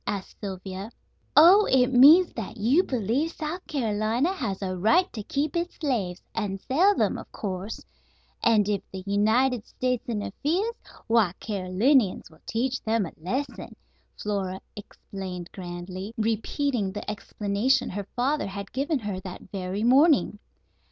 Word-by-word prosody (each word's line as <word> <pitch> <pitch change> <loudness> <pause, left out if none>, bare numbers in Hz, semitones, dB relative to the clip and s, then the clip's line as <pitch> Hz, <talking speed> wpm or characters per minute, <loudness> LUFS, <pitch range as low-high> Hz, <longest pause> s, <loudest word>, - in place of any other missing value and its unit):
asked 200 -2 -4
Sylvia. 190 0 -6 0.5
"Oh, 370 +7 +8
it 265 0 +3
means 310 +8 +7
that 225 0 -6
you 245 - +4
believe 255 - -1
South 320 +4 -5
Carolina 230 - 0
has 205 - -3
a 185 -1 -2
right 225 - +4
to 220 - -5
keep 285 +8 -2
its 345 +1 -2
slaves, 210 - -2
and 200 -3 -2
sell 355 - +3
them, - - +1
of - - -12
course; 195 +1 -5 0.6
and 215 -3 +4
if 205 -2 0
the 190 -1 -7
United 220 +4 +2
States 250 0 -2
interferes, 300 - -1 0.3
why, 225 -6 +3
Carolinians 200 - +1
will 160 - -20
teach 255 +3 -1
them 220 -2 0
a 165 - -7
lesson," 250 - -4 0.4
Flora 195 -3 -2 0.2
explained 190 -3 -8
grandly, 185 +3 -7
repeating 225 0 -1
the 210 - -6
explanation 210 +5 0
her 200 0 -5
father 270 +3 0
had 200 0 -7
given 285 +4 0
her 205 -6 -4
that 185 0 -10
very 190 +1 -3
morning. 265 -3 +4
220 Hz, 140 wpm, -26 LUFS, 195-265 Hz, 0.6 s, Oh